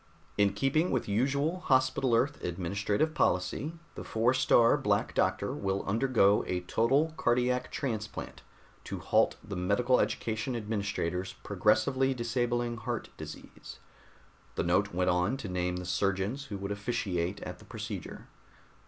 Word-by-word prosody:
In 100 -1 +3
keeping 135 - +1
with 130 - -1
usual 140 - +1
Hospital 130 -5 +2
Earth 140 +5 0
administrative 100 - -1
policy, 130 - 0 0.2
the - - -7
Four 115 +3 +2
star 120 -3 +5
Black - - 0
Doctor - - +1
will 95 0 -2
undergo 110 -2 +3
a 90 -1 -1
total 135 - +2
cardiac 125 +1 +1
transplant 110 -6 -4 0.4
to - - -4
halt - - +2
the 100 - -6
Medical 100 +8 +2
education 110 +3 -1
administrator's 100 -5 -2
progressively 135 0 +2
disabling 120 0 -1
heart 110 - -4
disease." - - -10 0.8
The - - 0
note 95 +4 +2
went 90 +1 +1
on 90 +9 +1
to 115 - -6
name 90 -1 -1
the 90 0 -5
surgeons 100 - -1
who 105 -7 -5
would 100 +1 -5
officiate 100 -3 -2
at - - -7
the - - -15
procedure. - - -7
110 Hz, 135 wpm, -30 LUFS, 95-130 Hz, 0.8 s, star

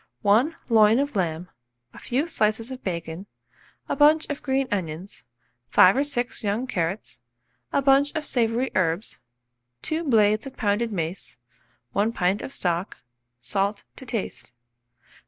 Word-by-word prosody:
1 230 +11 +3
loin 220 -1 +6
of 285 -1 -1
lamb, 175 -2 -1 0.5
a - - -12
few 265 +5 -1
slices 225 -5 0
of 260 0 -8
bacon, 170 +1 -5 0.6
1 - - -3
bunch 305 +2 +5
of 290 - -5
green 270 -1 0
onions, 180 -1 -4 0.4
5 185 - +6
or 280 - +3
6 245 -6 -2
young 210 +5 -1
carrots, 185 -3 -3 0.5
a 280 - +1
bunch 275 +1 +4
of 310 -1 -2
savoury 240 +1 0
herbs, 175 +3 -1 0.6
2 315 +2 -2
blades 215 -4 +3
of 265 - -11
pounded 220 +1 0
mace, 170 -5 -3 0.5
1 210 - +1
pint 190 -1 +1
of - - -6
stock, 175 -4 -2 0.4
salt 195 - -1
to - - -10
taste. 230 - -5
215 Hz, 140 wpm, -25 LUFS, 190-265 Hz, 0.6 s, loin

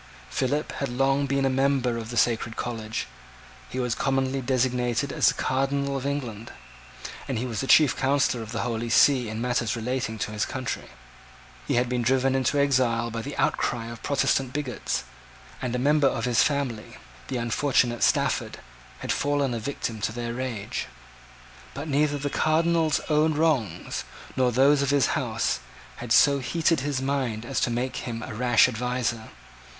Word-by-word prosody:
Philip 140 +3 -1
had 140 - -1
long 135 +3 +1
been 140 0 +1
a - - +3
member 135 -2 +1
of 115 -1 -5
the 120 - -5
sacred 115 -1 +1
college: 115 -2 -4 0.6
he 130 - -4
was 125 -2 0
commonly 135 +1 0
designated 125 0 0
as - - +3
the - - +3
Cardinal 140 +1 0
of 135 0 -2
England; 120 -6 -4 0.8
and 130 - -2
he 120 - -2
was 115 -4 -3
the 135 - -3
chief 150 0 +6
counsellor 135 -2 +1
of 110 -1 -8
the 115 - -2
Holy 115 -1 -2
See 125 0 +4
in 110 +1 -4
matters 120 -2 0
relating 120 0 -2
to 105 - -3
his 105 0 -1
country. 130 -2 -4 0.8
He - - +1
had 120 +1 +2
been 125 0 -1
driven 130 +2 +2
into 135 +2 +1
exile 125 -4 +2
by 115 0 -3
the 140 +4 -7
outcry 115 -1 0
of 115 - -10
Protestant 135 -2 +1
bigots; 140 -4 -2 0.6
and 125 -1 -2
a - - +1
member 145 +2 +3
of 120 -3 -1
his 125 -1 +3
family, 135 -7 -1 0.3
the 130 - -3
unfortunate 120 0 +1
Stafford, - - +1 0.4
had - - -2
fallen 145 -2 0
a 115 - -2
victim 115 -2 -4
to 110 - 0
their 120 +1 -4
rage. 120 -5 -4 0.9
But 140 +3 -5
neither 145 0 +1
the 145 0 -3
Cardinal's 160 0 +2
own 155 0 +2
wrongs, 150 -8 0 0.3
nor 130 -1 +2
those 135 +4 +4
of 140 - 0
his 140 -3 +3
house, - - -1 0.4
had 120 -2 -7
so 140 +3 +5
heated 160 +5 +1
his 135 -1 -2
mind 130 -5 -1
as 135 +2 -1
to - - +1
make 120 +2 -2
him 115 -2 -5
a 130 - -6
rash 120 +1 +4
adviser. 125 -2 -2
130 Hz, 175 wpm, -26 LUFS, 120-140 Hz, 0.9 s, chief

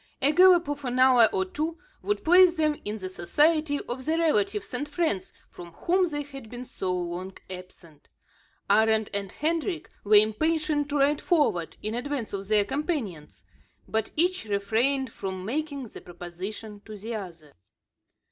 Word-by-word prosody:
A 285 - +4
gallop 360 0 +6
of 290 0 -4
an 250 -1 -2
hour 255 -3 +6
or 190 0 0
two, 315 - -4 0.2
would 415 - -2
place 360 +1 +6
them 305 -2 0
in 210 +1 -4
the 190 -3 -6
society 295 - +1
of 255 +2 -6
the 315 +4 0
relatives 210 -12 0
and 290 +4 -3
friends 295 - -1 0.2
from 170 -1 -11
whom 365 - +1
they 295 -3 -3
had 275 -5 -11
been 245 +1 -7
so 190 -6 -4
long 180 +1 -4
absent. 180 -4 -12 0.6
Arend 220 +1 +3
and 200 -2 -3
Hendrik 330 +3 -2
were 210 +1 +4
impatient 295 +7 +2
to 290 - -1
ride 285 +1 +2
forward, 290 - +1
in 215 - -2
advance 250 -2 -3
of 195 -1 -4
their 210 -1 +3
companions. 265 - -4 0.4
But 220 0 -1
each 355 -4 +1
refrained 225 +6 0
from 190 -3 -6
making 280 0 -3
the - - -11
proposition 190 +5 -8
to 215 -1 -9
the 220 +4 -6
other. 170 -8 -8
240 Hz, 160 wpm, -26 LUFS, 200-300 Hz, 0.6 s, gallop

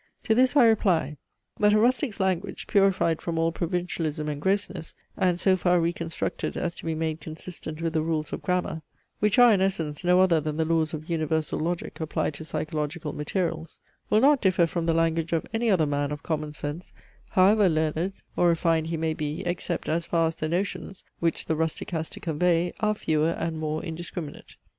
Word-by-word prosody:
To 220 - +2
this 255 +4 +3
I 270 -5 +7
reply; 180 -9 +2 0.4
that 210 0 +5
a 215 - +5
rustic's 245 -1 +1
language, 190 0 -1
purified 190 -5 +2
from 170 -1 -3
all 165 0 +2
provincialism 165 -3 -2
and 145 -1 -4
grossness, 190 -2 -1 0.2
and 180 -1 +1
so 190 +1 +4
far 180 -1 +2
reconstructed 170 0 -2
as 170 -1 -2
to - - -10
be 160 - -1
made 160 0 -2
consistent 160 0 -6
with 165 -1 -1
the 160 - +1
rules 155 -1 -2
of - - -4
grammar 180 -3 -1 0.4
(which 210 +2 +2
are 245 -2 +8
in 195 - +2
essence 165 -6 -1
no 180 +1 +4
other 175 -4 +4
than 155 0 -3
the 160 - +1
laws 160 -1 +1
of 155 +1 -8
universal 160 -2 -1
logic, 170 +2 -3
applied 155 -1 -1
to 150 - -8
psychological 155 0 -3
materials) 165 +1 -3 0.3
will 215 +1 +4
not 280 0 +5
differ 185 -3 +3
from 165 0 -3
the 165 - +2
language 165 0 +1
of 165 - 0
any 230 +1 +1
other 180 -6 +3
man 145 0 -1
of 150 - -5
common 155 -2 -2
sense, 150 +3 -6 0.4
however 195 +1 +5
learned 160 +3 0 0.2
or 175 - +3
refined 165 -1 +2
he 165 0 -2
may 160 0 0
be, 155 +3 -4
except 175 0 -2
as 165 +2 -1
far 165 -1 +2
as 160 0 -1
the 155 - -2
notions, 190 +2 -3 0.2
which 165 -1 0
the 160 - 0
rustic 160 +2 -2
has 160 -2 -2
to 205 - -9
convey, 175 0 +1
are 215 0 +1
fewer 155 -4 +1
and 165 -1 -3
more 155 0 -2
indiscriminate. 165 -1 -7
165 Hz, 195 wpm, -26 LUFS, 155-185 Hz, 0.4 s, are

